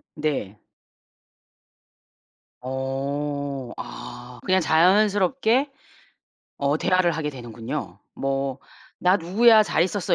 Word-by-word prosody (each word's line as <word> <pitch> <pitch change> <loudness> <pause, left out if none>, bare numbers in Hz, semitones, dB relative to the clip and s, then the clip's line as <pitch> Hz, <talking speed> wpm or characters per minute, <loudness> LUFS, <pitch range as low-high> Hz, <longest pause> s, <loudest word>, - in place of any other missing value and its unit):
네. 140 -9 -3 2.0
어. 135 0 -3
아 125 0 -9
그냥 185 0 +3
자연스럽게 205 - +3 0.9
어 140 +1 +1
대화를 185 -2 +2
하게 150 -1 -2
되는군요. 120 -4 -6 0.2
뭐 135 -1 -2 0.4
"나 180 +2 +4
누구야. 215 +6 +5
잘 165 - +1
있었어?" 185 +1 0
150 Hz, 170 characters per minute, -24 LUFS, 135-185 Hz, 2.0 s, 누구야